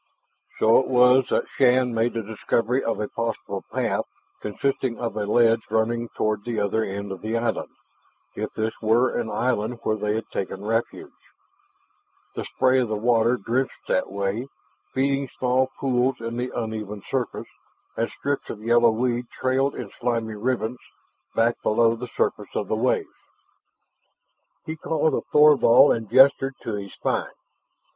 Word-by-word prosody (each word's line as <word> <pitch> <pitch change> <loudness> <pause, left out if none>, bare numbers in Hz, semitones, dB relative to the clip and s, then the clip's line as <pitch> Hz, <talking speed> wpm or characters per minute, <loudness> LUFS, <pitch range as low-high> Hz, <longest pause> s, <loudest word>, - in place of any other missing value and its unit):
So 110 +1 +5
it 130 - -1
was 125 0 +5
that - - 0
Shann 125 -1 +3
made 115 +1 +1
the 115 -1 -3
discovery 115 +4 -1
of 115 - -1
a 105 - -2
possible 115 -1 -4
path - - -1 0.4
consisting 130 +3 -2
of 115 -3 -3
a 105 -1 -2
ledge 115 +1 +4
running 115 +2 0
toward 110 -1 0
the 120 -1 -2
other 105 +2 0
end 100 0 -5
of 95 - -7
the 110 +2 -1
island, 115 0 -2 0.7
if - - -4
this 110 +1 -1
were 115 +3 +2
an 115 -2 -2
island 120 +1 -1
where 110 - +1
they 105 0 -1
had 110 - -4
taken 95 +1 -4
refuge. 115 +2 -2 1.2
The - - -5
spray 130 0 +2
of 125 - +1
the 110 - -2
water 115 +2 +2
drenched 125 +5 -2
that 95 - 0
way, 100 +5 -2 0.4
feeding 135 +1 0
small 130 +1 +2
pools 130 -1 +1
in 115 0 -5
the 125 +1 -2
uneven 105 -3 -5
surface, 130 -3 -3 0.5
and 115 - -1
strips 145 0 -3
of 105 -1 -7
yellow 120 +1 +5
weed 120 +1 -1
trailed 130 +2 0
in 115 -5 -7
slimy 115 -2 -1
ribbons 120 +2 -2 0.6
back 115 +1 +2
below 115 +1 +3
the 125 +2 -6
surface - - -2
of - - -1
the - - 0
waves. - - +1 1.6
He 160 - -4
called 160 0 0
to - - 0
Thorvald 150 -3 +6
and 115 -3 -6
gestured 135 +1 +5
to 115 - -3
his 100 -1 -6
find. - - -1
115 Hz, 160 wpm, -24 LUFS, 110-125 Hz, 1.6 s, Thorvald